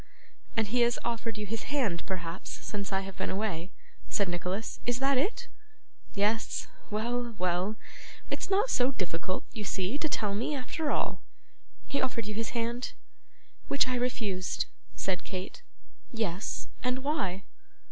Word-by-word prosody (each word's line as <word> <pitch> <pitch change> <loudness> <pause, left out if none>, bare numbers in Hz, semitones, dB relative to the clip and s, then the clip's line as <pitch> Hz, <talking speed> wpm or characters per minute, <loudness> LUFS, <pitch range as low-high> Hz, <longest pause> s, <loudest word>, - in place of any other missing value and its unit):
'And 225 - +5
he 245 +2 +4
has 235 0 +5
offered 230 -2 0
you 210 - -2
his 225 +3 -2
hand, 235 -12 +2
perhaps, 175 -1 -3 0.2
since 200 -1 -2
I 195 0 +3
have 195 -1 -6
been 190 - 0
away,' 190 -4 0 0.4
said 200 -2 +3
Nicholas; 180 +5 -1
'is 245 0 +2
that 270 +1 +4
it? 480 - +1 0.7
Yes. 210 +3 +2 0.2
Well, 235 +2 0
well; 185 +3 +2 0.6
it - - +1
is - - -1
not 410 +5 +4
so 250 +1 +5
difficult, 185 -3 -1
you 215 - -3
see, 195 +7 0
to 315 - +1
tell 210 -7 +1
me, 235 +8 +1
after 290 +3 -1
all. - - +1 0.6
He 275 - 0
offered 240 -4 +1
you 210 - -2
his 225 +1 0
hand?' 235 +2 0 0.7
'Which 280 -1 +5
I 255 - +1
refused,' 225 -7 +1 0.3
said 185 -2 0
Kate. 185 0 -4 0.5
'Yes; 215 -5 -1
and 255 +1 +1
why? 195 - +1
220 Hz, 155 wpm, -31 LUFS, 190-250 Hz, 0.7 s, And